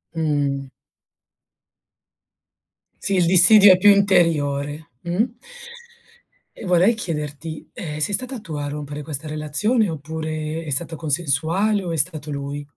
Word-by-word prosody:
Mh. 145 Hz, -4 st, -1 dB, 2.3 s
Sì, 200 Hz, -, -1 dB
il 180 Hz, -2 st, +3 dB
dissidio 190 Hz, +3 st, +8 dB
è -, -, +2 dB
più 205 Hz, +3 st, +5 dB
interiore. 160 Hz, -7 st, +1 dB
Mh? 175 Hz, +5 st, 0 dB, 1.3 s
E -, -, -10 dB
vorrei 180 Hz, +5 st, +3 dB
chiederti: 155 Hz, -5 st, -5 dB
ehm, 150 Hz, -4 st, -6 dB
sei 155 Hz, +7 st, 0 dB
stata 255 Hz, +5 st, -3 dB
tu 185 Hz, -7 st, -10 dB
a 145 Hz, -1 st, -4 dB
rompere 145 Hz, 0 st, -6 dB
questa 150 Hz, 0 st, -5 dB
relazione, 165 Hz, -, 0 dB
oppure 155 Hz, +1 st, -5 dB
è 160 Hz, -, -8 dB
stato 160 Hz, +4 st, -1 dB
consensuale, 165 Hz, +7 st, 0 dB
o 175 Hz, -, -4 dB
è -, -, -2 dB
stato 155 Hz, -1 st, -2 dB
lui? 140 Hz, 0 st, -5 dB
160 Hz, 125 wpm, -21 LUFS, 145-185 Hz, 2.3 s, dissidio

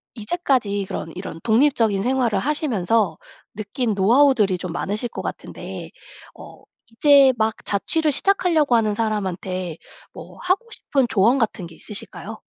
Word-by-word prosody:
이제까지 225 Hz, -, -1 dB
그런 165 Hz, -, -5 dB
이런 180 Hz, -3 st, -7 dB
독립적인 225 Hz, -4 st, +2 dB
생활을 245 Hz, -4 st, +1 dB
하시면서 225 Hz, -, 0 dB, 0.4 s
느낀 220 Hz, +2 st, -2 dB
노하우들이 220 Hz, -1 st, +4 dB
좀 180 Hz, -1 st, -6 dB
많으실 210 Hz, +7 st, -3 dB
것 -, -, -6 dB
같은데 -, -, -7 dB, 0.5 s
어 -, -, -13 dB, 0.3 s
이제 275 Hz, +2 st, +6 dB
막 220 Hz, 0 st, +1 dB
자취를 305 Hz, +10 st, +1 dB
시작하려고 330 Hz, -6 st, +2 dB
하는 215 Hz, -2 st, +2 dB
사람한테 185 Hz, -5 st, -3 dB, 0.4 s
뭐 -, -, -11 dB
하고 375 Hz, +6 st, 0 dB
싶은 270 Hz, -, 0 dB
조언 225 Hz, +7 st, +3 dB
같은 215 Hz, -5 st, -1 dB
게 165 Hz, -1 st, -12 dB
있으실까요? 220 Hz, +1 st, -6 dB
225 Hz, 320 characters per minute, -22 LUFS, 200-270 Hz, 0.5 s, 이제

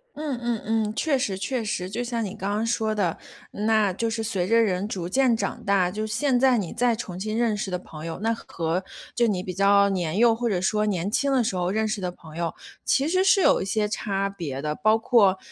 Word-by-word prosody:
嗯 295 Hz, -4 st, -3 dB
嗯 235 Hz, -2 st, -1 dB
嗯， 220 Hz, -1 st, 0 dB
确 295 Hz, 0 st, +1 dB
实 200 Hz, -7 st, -2 dB
确 240 Hz, +4 st, -2 dB
实， 185 Hz, -4 st, -3 dB
就 235 Hz, +5 st, -3 dB
像 235 Hz, -2 st, -2 dB
你 190 Hz, -, -6 dB
刚 195 Hz, +2 st, -3 dB
刚 215 Hz, +2 st, 0 dB
说 220 Hz, -2 st, 0 dB
的， 185 Hz, -6 st, 0 dB, 0.4 s
那 215 Hz, -2 st, +1 dB
就 230 Hz, +5 st, -1 dB
是 225 Hz, 0 st, -3 dB
随 190 Hz, -5 st, -1 dB
着 230 Hz, +2 st, +4 dB
人 195 Hz, -1 st, 0 dB
逐 180 Hz, -5 st, -4 dB
渐 245 Hz, +3 st, +2 dB
长 200 Hz, -, -3 dB
大， 190 Hz, -3 st, +2 dB
就 215 Hz, +3 st, -3 dB
现 255 Hz, +4 st, +1 dB
在 260 Hz, -1 st, +4 dB
你 190 Hz, -6 st, -3 dB
再 245 Hz, -1 st, +2 dB
重 185 Hz, -6 st, -6 dB
新 215 Hz, +3 st, -3 dB
认 235 Hz, -3 st, +2 dB
识 205 Hz, -1 st, -3 dB
的 180 Hz, -, -1 dB
朋 160 Hz, -3 st, -10 dB
友， 165 Hz, -, -5 dB
那 225 Hz, +3 st, +1 dB
和 170 Hz, -4 st, -3 dB, 0.3 s
就 240 Hz, -1 st, +3 dB
你 190 Hz, -4 st, -1 dB
比 185 Hz, -, -5 dB
较 200 Hz, +1 st, +4 dB
年 180 Hz, -3 st, -1 dB
幼 235 Hz, +1 st, +5 dB
或 235 Hz, 0 st, -1 dB
者 185 Hz, -, 0 dB
说 210 Hz, +3 st, +1 dB
年 185 Hz, -1 st, -1 dB
轻 280 Hz, +4 st, +1 dB
的 260 Hz, -3 st, +3 dB
时 205 Hz, -, -2 dB
候 180 Hz, -1 st, 0 dB
认 220 Hz, +3 st, 0 dB
识 210 Hz, -2 st, -3 dB
的 180 Hz, -1 st, -2 dB
朋 160 Hz, -2 st, -13 dB
友， 170 Hz, -1 st, -2 dB, 0.3 s
其 275 Hz, +2 st, +2 dB
实 370 Hz, +3 st, +2 dB
是 390 Hz, 0 st, +4 dB
有 285 Hz, -5 st, +4 dB
一 -, -, -2 dB
些 210 Hz, +1 st, 0 dB
差 195 Hz, -2 st, -2 dB
别 155 Hz, -9 st, -5 dB
的， 150 Hz, 0 st, -2 dB
包 215 Hz, +6 st, +3 dB
括 205 Hz, -5 st, +4 dB
210 Hz, 265 characters per minute, -25 LUFS, 185-230 Hz, 0.4 s, 幼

